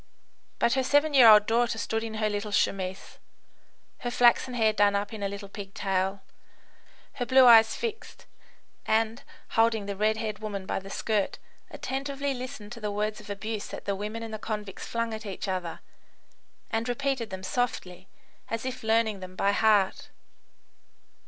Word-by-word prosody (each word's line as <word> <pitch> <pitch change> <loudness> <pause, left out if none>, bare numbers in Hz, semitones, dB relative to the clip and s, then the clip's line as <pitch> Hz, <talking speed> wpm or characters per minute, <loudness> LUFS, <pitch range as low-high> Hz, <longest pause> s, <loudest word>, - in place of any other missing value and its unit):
But 235 - +2
her 265 - +2
seven 290 +3 +2
year 255 -4 +8
old 210 -1 +8
daughter 230 0 +1
stood 225 +1 -2
in 225 -1 -5
her 215 0 0
little 205 0 -3
chemise, 190 -1 -1 0.8
her 245 - -3
flaxen 245 +1 +3
hair 220 -2 +3
done 205 -1 +3
up 200 +2 -2
in 215 - -7
a 200 - -1
little 200 0 -7
pigtail, 195 -1 -3 0.9
her 245 - -3
blue 260 0 +7
eyes 225 -2 +7
fixed, 450 -2 -6 0.6
and, 225 +1 +1 0.3
holding 225 -2 +2
the 200 0 -4
red 215 +2 +1
haired 215 -1 -4
woman 205 -3 -5
by - - -2
the 195 0 -11
skirt, 210 0 -1 0.3
attentively 275 +1 -3
listened 250 -4 -7
to 240 - -8
the 210 - -2
words 210 +1 -2
of 210 - -13
abuse 210 +1 -4
that - - -8
the 200 - -1
women 210 +3 -5
and 225 -1 -7
the 215 - -4
convicts 210 -3 -5
flung 230 -1 -2
at 220 0 -6
each 195 +1 -5
other, 185 -3 -3 0.9
and 225 +2 -1
repeated 260 -2 -1
them 190 0 -7
softly, 190 -5 -3 0.4
as 230 +1 -3
if 260 0 -4
learning 220 -2 +1
them 185 0 -9
by 200 +2 +2
heart. 205 -2 +2
220 Hz, 170 wpm, -27 LUFS, 200-235 Hz, 0.9 s, year